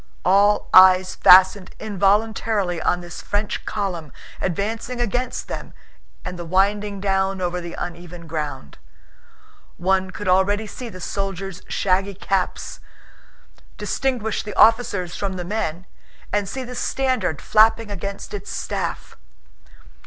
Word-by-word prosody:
All 200 Hz, +3 st, +4 dB
eyes 185 Hz, 0 st, +7 dB
fastened 185 Hz, +1 st, +6 dB
involuntarily 205 Hz, -2 st, 0 dB
on 180 Hz, -, +1 dB
this 175 Hz, -1 st, -9 dB
French 205 Hz, 0 st, -2 dB
column 180 Hz, -8 st, -3 dB, 0.3 s
advancing 220 Hz, +7 st, -3 dB
against 245 Hz, +2 st, -2 dB
them -, -, -7 dB, 0.5 s
and 180 Hz, -, -6 dB
winding 200 Hz, +2 st, +1 dB
down 195 Hz, 0 st, 0 dB
over 180 Hz, 0 st, -2 dB
the 170 Hz, 0 st, -7 dB
uneven 175 Hz, 0 st, -7 dB
ground. 150 Hz, -4 st, -5 dB, 1.0 s
One 190 Hz, +1 st, +1 dB
could 205 Hz, +1 st, -7 dB
already 195 Hz, +4 st, +2 dB
see 235 Hz, +3 st, -8 dB
the 185 Hz, -, -10 dB
soldiers' 195 Hz, 0 st, -4 dB
shaggy 195 Hz, +1 st, 0 dB
caps, 195 Hz, -1 st, -2 dB, 1.0 s
distinguish 250 Hz, -5 st, -1 dB
the 210 Hz, -2 st, -7 dB
officers 205 Hz, -6 st, +3 dB
from 200 Hz, -1 st, -3 dB
the 180 Hz, -1 st, -5 dB
men, 180 Hz, -3 st, -3 dB, 0.5 s
and 205 Hz, -1 st, 0 dB
see 265 Hz, +5 st, -4 dB
the 250 Hz, 0 st, -8 dB
standard 250 Hz, -, -1 dB
flapping 220 Hz, 0 st, +3 dB
against 200 Hz, +1 st, -6 dB
its 205 Hz, -1 st, -6 dB
staff. -, -, -4 dB
195 Hz, 120 wpm, -22 LUFS, 180-210 Hz, 1.0 s, eyes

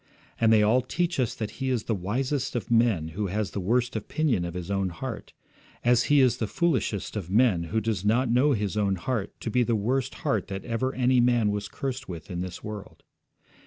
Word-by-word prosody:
And 115 Hz, -1 st, +4 dB
they 110 Hz, -1 st, +6 dB
all 115 Hz, +5 st, +4 dB
teach 170 Hz, +5 st, -1 dB
us 125 Hz, -4 st, 0 dB
that 110 Hz, -2 st, -4 dB
he 130 Hz, -, 0 dB
is 125 Hz, -4 st, 0 dB
the 115 Hz, -, -1 dB
wisest 125 Hz, +9 st, -2 dB
of 120 Hz, -2 st, -3 dB
men 115 Hz, -9 st, +3 dB
who 100 Hz, +5 st, -3 dB
has 105 Hz, +2 st, -2 dB
the -, -, -3 dB
worst 120 Hz, +6 st, 0 dB
opinion 120 Hz, -, 0 dB
of 85 Hz, 0 st, -6 dB
his 90 Hz, +1 st, -5 dB
own 95 Hz, -1 st, 0 dB
heart, 115 Hz, +7 st, -6 dB, 0.5 s
as 120 Hz, -1 st, +4 dB
he 145 Hz, -1 st, +5 dB
is 130 Hz, -3 st, +3 dB
the 110 Hz, -, -2 dB
foolishest 130 Hz, -, -1 dB
of 95 Hz, -5 st, -4 dB
men 100 Hz, -5 st, +3 dB
who 110 Hz, +7 st, 0 dB
does 110 Hz, -3 st, -2 dB
not 120 Hz, +5 st, +2 dB
know 125 Hz, +5 st, +3 dB
his 105 Hz, -3 st, -1 dB
own 100 Hz, -2 st, +1 dB
heart 105 Hz, +3 st, -3 dB
to 115 Hz, -, -3 dB
be 125 Hz, -, +3 dB
the 120 Hz, -1 st, +2 dB
worst 130 Hz, +5 st, -1 dB
heart 105 Hz, -5 st, +1 dB
that 95 Hz, -1 st, -6 dB
ever 125 Hz, +3 st, -1 dB
any 125 Hz, 0 st, +3 dB
man 120 Hz, -3 st, +3 dB
was 105 Hz, 0 st, -3 dB
cursed 135 Hz, -2 st, -5 dB
with 85 Hz, -2 st, -7 dB
in 90 Hz, 0 st, -3 dB
this 90 Hz, -1 st, -6 dB
world. 105 Hz, -2 st, -8 dB
110 Hz, 220 wpm, -27 LUFS, 100-125 Hz, 0.5 s, they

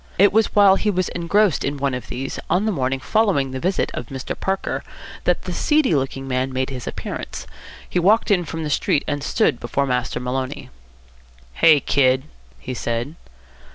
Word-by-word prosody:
It 200 Hz, +2 st, +5 dB
was 220 Hz, +1 st, +2 dB
while 200 Hz, -2 st, +7 dB
he 215 Hz, -, 0 dB
was 185 Hz, -3 st, 0 dB
engrossed 180 Hz, +2 st, +1 dB
in 145 Hz, +1 st, -2 dB
one 140 Hz, -1 st, -1 dB
of 125 Hz, -1 st, -5 dB
these, 135 Hz, +2 st, -5 dB
on 180 Hz, +5 st, +2 dB
the 220 Hz, -, +1 dB
morning 135 Hz, -5 st, -1 dB
following 175 Hz, -7 st, +1 dB
the 130 Hz, -, -4 dB
visit 185 Hz, +6 st, 0 dB
of -, -, -5 dB
Mr. 135 Hz, -2 st, -5 dB
Parker, 190 Hz, 0 st, -2 dB, 0.4 s
that -, -, +1 dB
the -, -, -4 dB
seedy 300 Hz, -, +2 dB
looking 135 Hz, -1 st, -1 dB
man 130 Hz, 0 st, -1 dB
made 130 Hz, +1 st, -2 dB
his 125 Hz, -2 st, -6 dB
appearance. -, -, -6 dB, 0.4 s
He 180 Hz, -, 0 dB
walked 210 Hz, +5 st, +3 dB
in 180 Hz, -3 st, +3 dB
from 160 Hz, +1 st, -5 dB
the 150 Hz, -, -3 dB
street, 145 Hz, -, +1 dB
and 145 Hz, -1 st, -2 dB
stood 135 Hz, -2 st, +1 dB
before 135 Hz, +4 st, -1 dB
Master 125 Hz, -2 st, -1 dB
Maloney. 130 Hz, +1 st, -4 dB, 0.8 s
"Hey, 155 Hz, -, +6 dB
kid," 130 Hz, -2 st, +2 dB, 0.4 s
he 130 Hz, -, -6 dB
said. 120 Hz, +3 st, -3 dB
140 Hz, 185 wpm, -21 LUFS, 130-190 Hz, 0.8 s, while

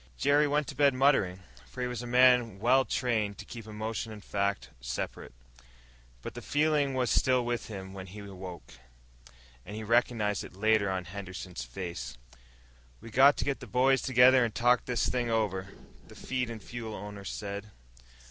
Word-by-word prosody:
Jerry 145 Hz, -, +3 dB
went 145 Hz, +1 st, +1 dB
to 140 Hz, -, -7 dB
bed 140 Hz, -1 st, +4 dB
muttering, 130 Hz, -9 st, +2 dB, 0.3 s
for -, -, -12 dB
he 125 Hz, -, 0 dB
was 125 Hz, -2 st, -4 dB
a 120 Hz, -, -6 dB
man 125 Hz, -4 st, +4 dB, 0.3 s
trained 110 Hz, -6 st, 0 dB
to -, -, -9 dB
keep 115 Hz, -2 st, -9 dB
emotion 110 Hz, +1 st, -4 dB
and 105 Hz, -2 st, -10 dB
fact 100 Hz, 0 st, -1 dB
well -, -, -27 dB
separate. -, -, -5 dB, 0.9 s
But -, -, -6 dB
the -, -, -7 dB
feeling 145 Hz, -2 st, +1 dB
was 125 Hz, -2 st, +1 dB
still 130 Hz, -2 st, +3 dB
with 120 Hz, -1 st, -2 dB
him 95 Hz, -3 st, -7 dB
when 95 Hz, -1 st, -8 dB
he 95 Hz, +4 st, -11 dB
awoke, 95 Hz, -7 st, -9 dB, 0.9 s
and 105 Hz, -, -8 dB
he 110 Hz, -, -5 dB
recognized 110 Hz, -2 st, +1 dB
it -, -, -11 dB
later 110 Hz, 0 st, +2 dB
on 95 Hz, -1 st, -2 dB
Henderson's 95 Hz, -5 st, -7 dB
face. 85 Hz, +2 st, -6 dB, 0.8 s
"We 115 Hz, -, -11 dB
got 135 Hz, +5 st, +6 dB
to 115 Hz, -, -1 dB
get 140 Hz, 0 st, -1 dB
the -, -, -10 dB
boys 130 Hz, +2 st, +3 dB
together 130 Hz, 0 st, +6 dB
and 115 Hz, -3 st, -2 dB
talk 120 Hz, 0 st, +3 dB
this 125 Hz, -3 st, 0 dB
thing 125 Hz, -2 st, -1 dB
over," 100 Hz, -4 st, -1 dB, 0.4 s
the -, -, -14 dB
feed 125 Hz, -2 st, -3 dB
and 115 Hz, -3 st, -7 dB
fuel 115 Hz, -3 st, -6 dB
owner 105 Hz, 0 st, -8 dB
said. 100 Hz, +1 st, -5 dB
115 Hz, 175 wpm, -30 LUFS, 100-125 Hz, 0.9 s, got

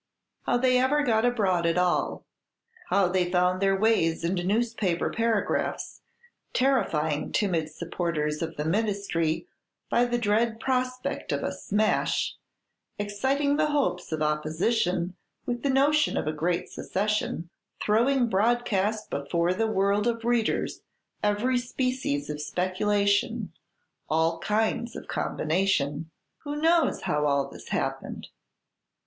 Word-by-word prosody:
How 245 Hz, -, +3 dB
they 255 Hz, 0 st, +3 dB
ever 290 Hz, +4 st, +2 dB
got 225 Hz, -3 st, +2 dB
abroad 190 Hz, -8 st, +2 dB
at 165 Hz, +1 st, +1 dB
all; 180 Hz, 0 st, 0 dB, 0.6 s
how 195 Hz, -1 st, +3 dB
they 180 Hz, 0 st, +1 dB
found 180 Hz, +1 st, +2 dB
their 195 Hz, 0 st, +3 dB
ways 190 Hz, -7 st, +2 dB
into 175 Hz, +1 st, 0 dB
newspaper 210 Hz, -3 st, 0 dB
paragraphs, 225 Hz, -2 st, -1 dB, 0.5 s
terrifying 160 Hz, -, +1 dB
timid 170 Hz, -7 st, 0 dB
supporters 155 Hz, -2 st, -2 dB
of 165 Hz, 0 st, -4 dB
the 150 Hz, -, -2 dB
ministry 195 Hz, -, 0 dB, 0.5 s
by 240 Hz, -, +4 dB
the 240 Hz, 0 st, 0 dB
dread 225 Hz, +1 st, +1 dB
prospect 255 Hz, 0 st, -2 dB
of -, -, -1 dB
a -, -, -1 dB
"smash," 215 Hz, +1 st, 0 dB, 0.6 s
exciting 265 Hz, +8 st, 0 dB
the 310 Hz, 0 st, +3 dB
hopes 280 Hz, -, -1 dB
of 155 Hz, -1 st, -1 dB
Opposition 170 Hz, +4 st, 0 dB, 0.3 s
with 240 Hz, -1 st, -2 dB
the 280 Hz, -, 0 dB
notion 290 Hz, +3 st, +3 dB
of -, -, -1 dB
a 155 Hz, -, -1 dB
great 170 Hz, +3 st, -1 dB
secession, 200 Hz, -4 st, -2 dB, 0.3 s
throwing 240 Hz, +4 st, +2 dB
broadcast 215 Hz, -1 st, +1 dB
before 170 Hz, +5 st, 0 dB
the 225 Hz, +4 st, 0 dB
world 200 Hz, +1 st, +1 dB
of 230 Hz, -1 st, -1 dB
readers 235 Hz, -2 st, 0 dB, 0.4 s
every 215 Hz, +5 st, +1 dB
species 250 Hz, -, -2 dB
of 150 Hz, 0 st, -4 dB
speculation, 200 Hz, +5 st, 0 dB, 0.6 s
all 160 Hz, +1 st, +1 dB
kinds 220 Hz, +2 st, 0 dB
of -, -, -8 dB
combination, 155 Hz, -3 st, 0 dB, 0.3 s
who 290 Hz, 0 st, -5 dB
knows 325 Hz, +2 st, +2 dB
how 150 Hz, 0 st, 0 dB
all 140 Hz, -1 st, +1 dB
this -, -, -12 dB
happened? -, -, -3 dB
205 Hz, 125 wpm, -27 LUFS, 170-240 Hz, 0.6 s, by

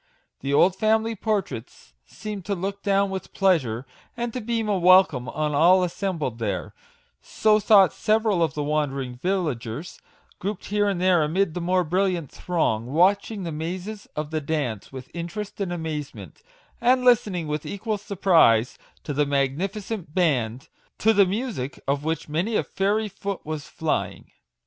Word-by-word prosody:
The 140 Hz, -, -3 dB
old 180 Hz, +6 st, +4 dB
family 220 Hz, +2 st, +1 dB
portraits 190 Hz, -, -4 dB
seemed 210 Hz, -3 st, -7 dB
to 200 Hz, -, -1 dB
look 195 Hz, +2 st, -4 dB
down 200 Hz, -1 st, +2 dB
with 190 Hz, -1 st, -6 dB
pleasure, 135 Hz, -, +1 dB, 0.3 s
and 235 Hz, -1 st, -3 dB
to 250 Hz, -, -3 dB
beam 225 Hz, 0 st, -1 dB
a 200 Hz, -3 st, +1 dB
welcome 180 Hz, -9 st, +5 dB
on 150 Hz, 0 st, -2 dB
all 175 Hz, +6 st, +5 dB
assem 185 Hz, +1 st, -2 dB
bled 125 Hz, -7 st, -3 dB
there; 95 Hz, -8 st, -3 dB, 0.5 s
so 215 Hz, -1 st, +2 dB
thought 200 Hz, -3 st, +5 dB
several 215 Hz, -4 st, +1 dB
of 160 Hz, -4 st, +1 dB
the 150 Hz, -, -1 dB
wander 145 Hz, -2 st, 0 dB
ing 125 Hz, -2 st, -5 dB
villagers, 150 Hz, -, -3 dB, 0.4 s
grouped 200 Hz, +1 st, -4 dB
here 205 Hz, 0 st, +1 dB
and 195 Hz, -3 st, -1 dB
there 180 Hz, -2 st, +4 dB
amid 165 Hz, +3 st, +1 dB
the 180 Hz, -, -4 dB
more 180 Hz, +1 st, +2 dB
brilliant 180 Hz, -2 st, 0 dB
throng, 120 Hz, -11 st, -1 dB
watching 195 Hz, -, +2 dB
the 170 Hz, -, -4 dB
mazes 180 Hz, +7 st, -5 dB
of 150 Hz, 0 st, -4 dB
the 155 Hz, -1 st, -1 dB
dance 140 Hz, -8 st, -3 dB
with 130 Hz, -1 st, -9 dB
interest 195 Hz, +5 st, -6 dB
and 190 Hz, -3 st, -2 dB
amazement, 160 Hz, -, -6 dB, 0.4 s
and 250 Hz, +1 st, +3 dB
listening 205 Hz, -8 st, +3 dB
with 150 Hz, 0 st, -3 dB
equal 210 Hz, +1 st, -3 dB
surprise 170 Hz, -, +3 dB, 0.2 s
to 150 Hz, -, -4 dB
the 145 Hz, +1 st, +1 dB
magnificent 165 Hz, +6 st, -2 dB
band, 130 Hz, -9 st, 0 dB, 0.3 s
to 220 Hz, +1 st, +3 dB
the 200 Hz, -2 st, +5 dB
music 190 Hz, -, -3 dB
of 140 Hz, +1 st, 0 dB
which 160 Hz, +1 st, -2 dB
many 175 Hz, +9 st, -1 dB
a -, -, +2 dB
fairy 210 Hz, +3 st, 0 dB
foot 195 Hz, -1 st, -6 dB
was 155 Hz, -2 st, -5 dB
flying. 160 Hz, -1 st, -3 dB
180 Hz, 165 wpm, -24 LUFS, 150-200 Hz, 0.5 s, welcome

